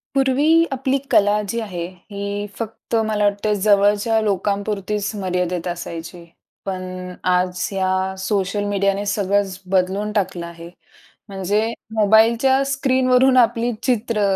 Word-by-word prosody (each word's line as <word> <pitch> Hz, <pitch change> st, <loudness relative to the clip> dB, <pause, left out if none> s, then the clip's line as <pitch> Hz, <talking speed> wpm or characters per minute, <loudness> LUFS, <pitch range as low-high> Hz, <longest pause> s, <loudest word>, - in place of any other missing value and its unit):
पूर्वी 285 Hz, +5 st, +4 dB
आपली 270 Hz, +1 st, 0 dB
कला 205 Hz, +1 st, +4 dB
जी 230 Hz, -, -1 dB
आहे 180 Hz, -6 st, -5 dB, 0.3 s
ही 200 Hz, 0 st, -4 dB
फक्त 230 Hz, +1 st, -5 dB
मला 215 Hz, -1 st, 0 dB
वाटत 205 Hz, +1 st, 0 dB, 0.2 s
जवळच्या 205 Hz, +2 st, +3 dB
लोकांपुरतीच 200 Hz, 0 st, -1 dB
मर्यादेत 180 Hz, -2 st, -2 dB
असायची. 170 Hz, 0 st, -6 dB, 0.4 s
पण 185 Hz, -1 st, -5 dB
आज 180 Hz, 0 st, +1 dB
या 190 Hz, 0 st, 0 dB
सोशल 195 Hz, +1 st, -1 dB
मीडियाने 200 Hz, 0 st, 0 dB
सगळंच 200 Hz, -1 st, 0 dB
बदलून 195 Hz, +3 st, +1 dB
टाकलं 190 Hz, -4 st, -1 dB
आहे. 170 Hz, 0 st, -10 dB, 0.6 s
म्हणजे 200 Hz, +2 st, 0 dB, 0.3 s
मोबाईलच्या 225 Hz, +5 st, +4 dB
स्क्रीनवरून 260 Hz, -1 st, +3 dB
आपली 235 Hz, 0 st, +3 dB
चित्र, 230 Hz, -3 st, 0 dB
205 Hz, 115 wpm, -20 LUFS, 185-225 Hz, 0.6 s, पूर्वी